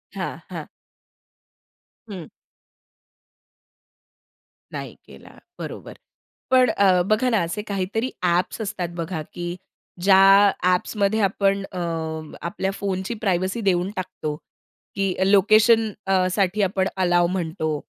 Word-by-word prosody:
हां, - - -4
हां. - - -7 1.4
हं. 180 -6 -7 2.4
नाही - - -7
केला. - - -15 0.2
बरोबर. - - -7 0.6
पण 255 -2 +5
अ, 185 -4 +3
बघा 215 +5 +2
ना 220 -3 +2
असे 190 +6 -3
काहीतरी 205 +5 -2
ॲप्स 180 +5 0
असतात 180 -4 -3
बघा, 165 -1 -4
की 175 0 -4 0.5
ज्या 195 +1 +6
ॲप्समध्ये 200 +4 +1
आपण 195 0 +1
अ, 185 - -7 0.6
आपल्या 190 +2 -3
फोनची 195 +2 -3
प्रायव्हसी 190 +3 0
देऊन 185 -1 +1
टाकतो, 155 -5 -4 0.6
की 195 -2 0 0.2
लोकेशन 215 +2 +5 0.2
अ, 185 -1 +3
साठी 200 +1 +1
आपण 190 0 0
अलाओ 175 -2 +3
म्हणतो 160 -4 -2
190 Hz, 105 wpm, -23 LUFS, 180-205 Hz, 2.4 s, ज्या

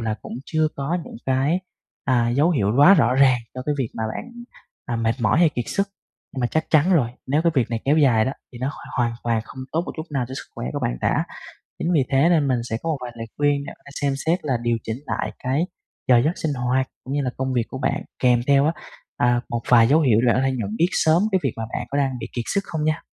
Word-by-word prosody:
là 110 -1 -1
cũng - - -8
chưa 155 -1 +1
có 140 +6 -1
những - - -10
cái, 135 +7 +1 0.4
à, 120 -3 +2
dấu 140 +8 +3
hiệu 105 - +1
quá 145 +8 +8
rõ 125 -8 +3
ràng 130 -2 +5 0.2
cho 130 - -5
cái 150 - +1
việc 130 -4 0
mà 110 - -2
bạn, - - -5 0.6
à, 120 - -2
mệt 115 0 +1
mỏi 110 +5 +3
hay 170 -1 +6
kiệt 125 -5 -3
sức, 200 0 0 0.4
nhưng 130 - -4
mà 120 - +2
chắc 155 +6 0
chắn 160 +4 +4
rồi, 135 -10 +3 0.2
nếu 145 +4 +1
cái 170 0 +2
việc 130 -5 +1
này 115 -1 -2
kéo 145 +3 +3
dài 125 -8 +4
đó 130 - -1 0.2
thì 120 - -9
nó 130 +3 -1
hoàn - - -11
hoàn 120 -2 +1
toàn 115 -1 +1
không - - -12
tốt 165 - +1
một - - -5
chút 155 +1 -5
nào 135 -4 -1
cho 130 - -6
sức - - -8
khỏe - - -5
của - - -2
bạn - - 0
cả. - - +1 0.5
Chính 175 - 0
vì 150 -6 +3
thế 140 +4 +4
nên 155 -5 +3
mình 130 -2 +2
sẽ 110 - -1
có 165 - -3
một 155 - 0
vài 120 -1 -6
lời 115 0 -6
khuyên 145 -1 +1
để - - -6
bạn 140 - -16
xem 140 -1 +1
xét 170 +3 +3
là 135 -4 +1
điều 120 -1 +1
chỉnh 110 0 -4
lại - - -2
cái 135 +7 0 0.4
giờ 125 -2 +7
giấc 155 - +2
sinh 155 - -1
hoạt, 130 +1 0 0.2
cũng 135 - -4
như 145 - +1
là 125 - -1
công 130 0 -2
việc 120 -2 +1
của 130 - -6
bạn, - - -1 0.2
kèm 125 -2 +3
theo 140 0 +4
á, 160 - +2 0.4
à, 120 0 +2
một 120 0 -3
vài 115 -2 +6
dấu 150 +4 +5
hiệu 120 -8 +4
là 120 -1 +4
ở 125 - +1
đây 135 0 +1
nhận 110 -4 -3
biết 170 - +4
sớm 160 +1 +3
cái 190 - +4
việc 135 -5 0
mà 115 - -3
bạn - - -3
có 140 - 0
đang 135 -3 0
bị - - -5
kiệt 120 - -1
sức 200 - +3
không 160 -3 -3
nha. 155 +1 0
135 Hz, 275 wpm, -23 LUFS, 120-155 Hz, 0.6 s, quá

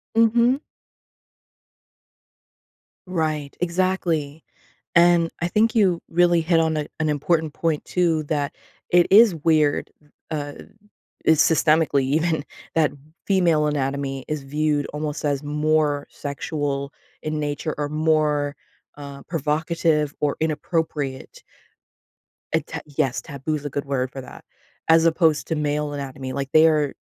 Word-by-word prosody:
Mhm. 235 +3 +4 2.5
Right, 155 -5 -2
exactly, 170 -4 -1 0.5
and 170 -1 +5
I 175 - 0
think 220 +4 +2
you 190 -6 +2
really 175 0 +3
hit 165 0 +3
on 160 -1 +1
a 150 -1 -2
an 155 - +1
important 155 +1 0
point, 160 -3 -1
too, 165 -4 +1
that 145 0 -2 0.4
it 175 0 +5
is 215 -1 +7
weird, 155 -2 +1 0.4
uh 145 -2 -3 0.7
it's 160 -1 +5
systemically 155 -3 +3
even, 155 +3 0 0.3
that 160 -3 +3 0.4
female 170 -6 +3
anatomy 135 -2 -2
is 150 -2 -3
viewed 150 +1 0
almost 150 0 -4
as 145 -1 0
more 150 -1 0
sexual 140 -1 -4 0.3
in 155 0 -3
nature 150 +1 -3
or 145 -1 -1
more, 150 -2 +1 0.4
uh, 140 -1 -9
provocative, 155 -1 0
or 145 -1 +1
inappropriate. 155 -3 -3 1.1
Eh, - - +3
ta - - -6 0.2
Yes, 130 -1 +1
taboo's 150 0 -4
good 145 +1 -4
word 130 -2 -2
for 135 - -7
that, 125 - -13 0.4
as 160 0 +5
opposed 160 -2 +2
to 160 - -1
male 150 0 -1
anatomy, 135 -2 -6
like, 135 0 -4
their 155 -3 +4
155 Hz, 120 wpm, -23 LUFS, 145-165 Hz, 2.5 s, is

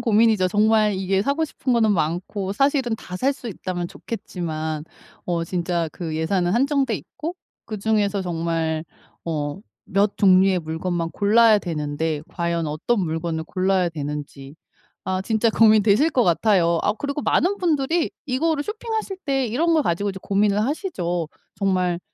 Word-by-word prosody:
고민이죠. 215 -4 +3
정말 215 +1 +3
이게 190 0 0
사고 280 +8 0
싶은 265 -4 -2
거는 220 -3 +3
많고 180 +4 -2
사실은 270 -2 +1
다 180 - -10
살 265 +8 +1
수 260 - -10
있다면 180 -3 -4
좋겠지만 160 -9 -5 0.4
어 170 -2 -1
진짜 170 -1 -1
그 165 -4 -5
예산은 175 +2 0
한정돼 270 -1 +2
있고 300 - -6 0.3
그중에서 210 -2 0
정말 165 -2 -2 0.4
어 150 0 -3 0.3
몇 200 +2 +1
종류의 190 -1 +5
물건만 165 +1 -3
골라야 220 +1 +5
되는데 150 -2 -2
과연 170 -2 -2
어떤 155 +10 -1
물건을 160 0 -3
골라야 185 0 +1
되는지 145 -2 -6 0.5
아 185 0 -1
진짜 220 +1 +2
고민되실 220 +6 +4
것 250 -5 +3
같아요. 175 -2 +3
아 205 - +2
그리고 280 +5 -4
많은 390 +4 +2
분들이 320 -1 +1 0.2
이거를 290 +4 +1
쇼핑하실 435 -1 -4
때 270 -3 +1
이런 325 +9 +1
걸 315 - +4
가지고 200 - 0
이제 190 - -9
고민을 205 +1 +2
하시죠. 180 - -2 0.3
정말 185 -3 0
195 Hz, 320 characters per minute, -23 LUFS, 170-235 Hz, 0.5 s, 종류의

